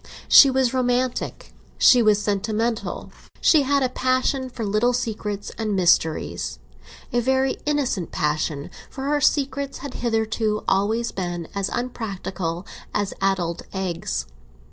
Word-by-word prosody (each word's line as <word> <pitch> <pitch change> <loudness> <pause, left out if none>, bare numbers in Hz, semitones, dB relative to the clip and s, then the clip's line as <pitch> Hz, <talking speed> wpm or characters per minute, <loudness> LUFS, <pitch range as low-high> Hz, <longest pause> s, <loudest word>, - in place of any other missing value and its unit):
She 275 - +9
was 260 -2 +1
romantic, 250 0 -1 0.2
she 250 -2 +6
was 215 -2 +4
sentimental, 215 +3 -2 0.3
she 310 - +5
had 280 0 +2
a 255 - +1
passion 255 +1 0
for 235 -3 -5
little 215 +5 +2
secrets 210 -4 -3
and 215 -2 -1
mysteries—a 110 - -1
very 265 +2 +1
innocent 270 - 0
passion, 150 -1 -1 0.2
for 265 - -7
her 290 +1 +1
secrets 280 -1 0
had 275 - -6
hitherto 220 -2 -1
always 220 +5 +1
been 175 -3 -4
as 200 -1 -1
unpractical 195 -7 -4 0.3
as 205 -1 0
addled 180 -3 0
eggs. 170 - -3
220 Hz, 120 wpm, -23 LUFS, 190-255 Hz, 0.3 s, She